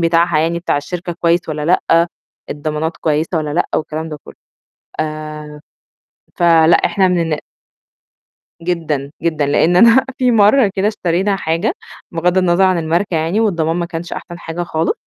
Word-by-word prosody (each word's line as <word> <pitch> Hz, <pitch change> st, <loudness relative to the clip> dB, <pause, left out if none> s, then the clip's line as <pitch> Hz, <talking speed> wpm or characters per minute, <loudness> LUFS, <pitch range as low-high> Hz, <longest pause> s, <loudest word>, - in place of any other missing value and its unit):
بتاعها 165 Hz, -1 st, +2 dB
يعني 165 Hz, +2 st, 0 dB
بتاع 170 Hz, -, -1 dB
الشركة 175 Hz, +4 st, -4 dB
كويس 170 Hz, +1 st, +3 dB
والّا 150 Hz, -1 st, -3 dB
لأ، 170 Hz, -1 st, +3 dB, 0.4 s
الضمانات 155 Hz, +2 st, -3 dB
كويسة 155 Hz, +3 st, -1 dB
والّا 150 Hz, -1 st, -3 dB
لأ 175 Hz, -, 0 dB
والكلام 160 Hz, +1 st, -3 dB
ده 150 Hz, -1 st, -7 dB
كُلّه. -, -, -12 dB, 0.7 s
آآ 155 Hz, -1 st, -6 dB, 0.8 s
فلأ 165 Hz, -1 st, +5 dB
إحنا 190 Hz, -2 st, +2 dB
من 180 Hz, -1 st, +1 dB
الن 160 Hz, -3 st, -1 dB, 1.2 s
جدًا، 160 Hz, -5 st, -2 dB
جدًا. 155 Hz, -3 st, 0 dB
لإن 160 Hz, +5 st, +2 dB
أنا 235 Hz, +6 st, +6 dB
في 250 Hz, -1 st, +2 dB
مرّة 215 Hz, +1 st, +4 dB
كده 200 Hz, +2 st, +1 dB
اشترينا 195 Hz, 0 st, 0 dB
حاجة، 165 Hz, +4 st, -1 dB, 0.4 s
بغض 175 Hz, +2 st, +1 dB
النظر 185 Hz, +1 st, +3 dB
عن 185 Hz, -2 st, +2 dB
الماركة 170 Hz, +4 st, -1 dB
يعني 165 Hz, +7 st, 0 dB
والضمان 170 Hz, -7 st, 0 dB
ما 175 Hz, -1 st, -2 dB
كانش 170 Hz, +1 st, -7 dB
أحسن 175 Hz, -1 st, -7 dB
حاجة 170 Hz, +1 st, -5 dB
خالص. 165 Hz, -1 st, -1 dB
170 Hz, 155 wpm, -17 LUFS, 155-180 Hz, 1.2 s, أنا